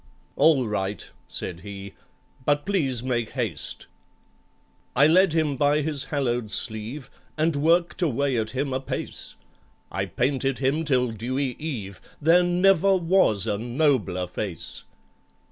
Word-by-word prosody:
"All 145 -6 +4
right," 100 -1 -3 0.2
said 85 -2 -5
he, 100 0 -8 0.5
"but 145 +1 +1
please 140 - 0
make 120 -3 -1
haste." 115 - -2 1.1
I 140 - +6
led 180 +2 +5
him 155 -3 +1
by 145 +3 +3
his 145 -2 -2
hallowed 125 -6 -1
sleeve, 115 +5 -2 0.3
And 155 0 +1
worked 170 +5 +2
away 140 -4 +1
at 110 0 -2
him 135 +2 -2
apace, 130 +1 -4 0.6
I - - -2
painted 135 -1 0
him 140 +5 0
till 125 -4 +2
dewy 125 +4 -2
eve,— 110 - -5 0.2
There 165 +4 +5
never 190 +2 +4
was 165 - +3
a 105 -2 -1
nobler 120 - +1
face! 90 0 -5
135 Hz, 130 wpm, -25 LUFS, 110-155 Hz, 1.1 s, I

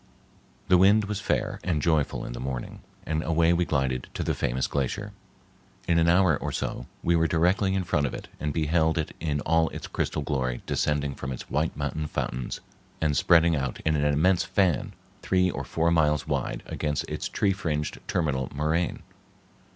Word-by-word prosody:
The 90 -1 +5
wind 100 +3 +6
was 100 -1 -3
fair 110 -2 -1
and 85 -4 0
joyful 75 -1 +1
in - - -6
the - - -6
morning, 65 -1 -5 0.2
and 80 0 -1
away 85 +1 +3
we 90 +1 +2
glided 65 -4 -1
to - - -2
the - - 0
famous 65 +1 -1
glacier. 95 +10 -2 0.8
In 85 -1 +3
an 85 - +3
hour 90 -2 +5
or - - -4
so - - -4 0.2
we 85 - +3
were 80 0 +3
directly 95 +4 +2
in 95 - 0
front 75 -4 +1
of - - -6
it - - -8
and 75 +1 -1
beheld 80 +1 +1
it 80 - -2
in 75 -2 -1
all 80 +1 +2
its - - -7
crystal - - -2
glory 65 -3 -2
descending 75 -1 0
from 65 0 -6
its 65 - -7
white 80 +3 0
mountain 75 +2 -2
fountains 65 -3 -3 0.4
and 75 -2 +1
spreading 85 +3 +5
out 65 -3 -2
in 80 -1 +1
an 75 - +1
immense 85 +5 +3
fan 90 -9 +1 0.3
three 90 -1 +2
or - - -4
four 85 +1 0
miles 75 -3 +2
wide - - -2
against 75 -1 -2
its - - -4
tree 100 -2 +1
fringed 75 -6 -3
terminal 70 -7 0
moraine. 80 +3 0
80 Hz, 185 wpm, -27 LUFS, 70-85 Hz, 0.8 s, wind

